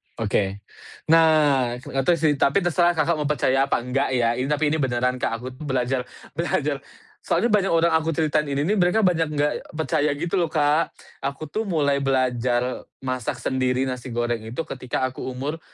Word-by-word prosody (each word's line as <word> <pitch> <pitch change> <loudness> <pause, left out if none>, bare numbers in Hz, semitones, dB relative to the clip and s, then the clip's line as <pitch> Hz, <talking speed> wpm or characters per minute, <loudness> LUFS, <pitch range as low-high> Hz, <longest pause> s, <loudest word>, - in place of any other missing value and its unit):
Oke. 100 -2 -1 0.5
Nah, 150 -6 +4
nggak 135 0 -2
tahu 175 - +5
sih 155 -2 +2
tapi 155 +8 +3
terserah 175 0 +2
Kakak 165 +1 +2
mau 150 - -1
percaya 135 -2 +2
apa 120 - 0
enggak 125 +3 0
ya, 120 -2 +2
ini 130 - -1
tapi 150 0 +1
ini 160 - +1
beneran 125 -1 0
Kak, - - -1
aku 125 - -9
tuh 155 - -8
belajar 130 -1 0 0.3
belajar 150 -3 -1 0.4
soalnya 235 - 0
banyak 200 -2 +3
orang 165 +1 +3
aku 160 -1 +1
ceritain 155 -1 +1
ini 140 0 -1
nih 205 +7 +1
mereka 180 +5 +3
banyak 165 -3 +2
enggak 145 0 +1 0.2
percaya 155 -1 +1
gitu 175 +5 -1
loh, 170 - +2
Kak. 150 +1 +1 0.2
Aku 140 +2 -4
tuh 220 -1 -2
mulai 140 -5 +1
belajar 125 -2 0 0.2
masak 130 -3 -2
sendiri 130 0 0
nasi 130 -1 -4
goreng 120 -1 -1
itu 120 +8 -3
ketika 130 -2 -4
aku 130 - -10
umur, 140 +5 -4
140 Hz, 185 wpm, -23 LUFS, 130-160 Hz, 0.5 s, tahu